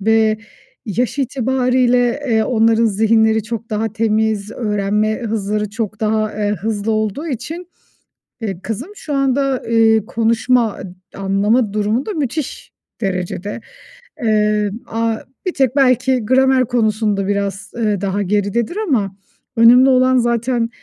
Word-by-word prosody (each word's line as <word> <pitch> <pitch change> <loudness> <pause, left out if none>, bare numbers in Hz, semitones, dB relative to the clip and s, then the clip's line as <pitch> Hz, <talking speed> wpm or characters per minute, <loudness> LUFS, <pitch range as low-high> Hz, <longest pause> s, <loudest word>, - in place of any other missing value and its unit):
Ve 220 +1 +2 0.5
yaş 245 +6 -1
itibarıyla, 255 -1 +1 0.3
eee, 220 -1 +3
onların 225 -1 +3
zihinleri 220 +1 +3
çok 230 0 -6
daha 215 0 -1
temiz, 220 -2 0
öğrenme 210 0 -1
hızları 210 -1 -2
çok 215 -1 -4
daha, 215 0 0
eee, 205 -1 -1
hızlı 220 0 -1
olduğu 215 +8 -2
için, 325 +6 -5 0.7
eee, 195 -5 -4
kızım 250 - -5
şu 300 - -6
anda, 275 -1 +1
eee, 225 -2 +3
konuşma 230 0 +1
ı - - -8 0.3
anlama 200 +3 +1
durumu 215 +5 0
da 430 - -3
müthiş 300 - -4 0.3
derecede. 195 +2 -3 0.6
Eee, 210 -1 +2 0.2
aaa, 225 0 -1 0.3
bir 365 - -1
tek 265 -2 +1
belki 255 -3 +2
gramer 260 +1 +3
konusunda 215 -4 0
biraz, 200 -1 -2
eee, 210 -4 0
daha 200 0 -1
geridedir 210 - -1
ama 200 - 0 0.4
önemli 245 +3 +7
olan 255 0 +4
zaten, 235 0 0
225 Hz, 125 wpm, -18 LUFS, 210-250 Hz, 0.7 s, önemli